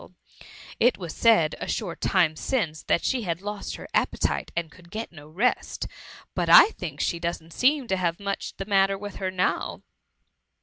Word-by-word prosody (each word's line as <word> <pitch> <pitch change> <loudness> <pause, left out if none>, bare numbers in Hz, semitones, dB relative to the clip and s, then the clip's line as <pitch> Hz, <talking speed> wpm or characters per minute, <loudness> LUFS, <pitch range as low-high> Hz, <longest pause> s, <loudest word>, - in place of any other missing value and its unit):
*^ - - -16 0.7
It 245 +2 +4
was 175 -5 -6
said 215 -10 +4
a - - -5
short 180 -7 -3
time 170 -5 +3
since, 160 - -1
that 170 - +2
she 255 - 0
had 170 -5 -2
lost 205 +1 -5
her - - -9
appetite - - 0
and 170 -2 -2
could 175 -2 -17
get 220 +5 -5
no 150 -3 -13
rest; 210 +11 0 0.5
but - - -1
I - - +10
think 160 - -7
she 170 - 0
doesn't 170 -1 -4
seem 275 +1 +2
to 190 -4 0
have 170 -2 -1
much 200 -1 -4
the 195 - -4
xnatter 195 -1 +2
with 205 -1 -7
her 190 - -2
now.'' 185 0 -1
185 Hz, 185 wpm, -26 LUFS, 170-210 Hz, 0.7 s, I